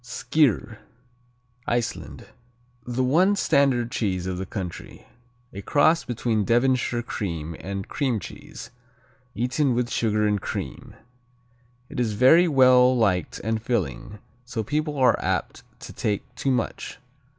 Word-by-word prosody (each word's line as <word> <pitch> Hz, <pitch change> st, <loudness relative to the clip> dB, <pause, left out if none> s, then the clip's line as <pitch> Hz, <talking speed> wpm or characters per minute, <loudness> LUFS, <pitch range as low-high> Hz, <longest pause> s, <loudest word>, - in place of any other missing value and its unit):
Skyr 120 Hz, -3 st, 0 dB, 0.9 s
Iceland 120 Hz, -1 st, -3 dB, 0.6 s
The 125 Hz, +1 st, -1 dB
one 175 Hz, +10 st, +3 dB
standard 135 Hz, -9 st, +2 dB
cheese 95 Hz, -5 st, -1 dB
of 90 Hz, -1 st, -3 dB
the 95 Hz, -, -5 dB
country. 95 Hz, -4 st, -7 dB, 0.5 s
A 100 Hz, -, -6 dB
cross 155 Hz, -, +3 dB
between 115 Hz, -3 st, -1 dB
Devonshire 120 Hz, +1 st, +1 dB
cream 85 Hz, -8 st, -4 dB
and 100 Hz, 0 st, -5 dB
cream 130 Hz, -6 st, -1 dB
cheese, -, -, -10 dB, 0.6 s
eaten 125 Hz, +3 st, 0 dB
with 120 Hz, 0 st, -1 dB
sugar 110 Hz, -3 st, +1 dB
and 105 Hz, -2 st, +1 dB
cream. -, -, -6 dB, 0.9 s
It -, -, -7 dB
is 115 Hz, -3 st, 0 dB
very 145 Hz, +11 st, +6 dB
well 130 Hz, -3 st, +5 dB
liked 95 Hz, -7 st, 0 dB
and 110 Hz, +1 st, -1 dB
filling, 105 Hz, -, -3 dB, 0.3 s
so 125 Hz, -3 st, -4 dB
people 150 Hz, +5 st, -2 dB
are 130 Hz, -2 st, +3 dB
apt -, -, -2 dB, 0.2 s
to -, -, -9 dB
take 105 Hz, -2 st, -3 dB
too 135 Hz, -, -2 dB
much. 125 Hz, -3 st, -2 dB
120 Hz, 130 wpm, -24 LUFS, 105-130 Hz, 0.9 s, very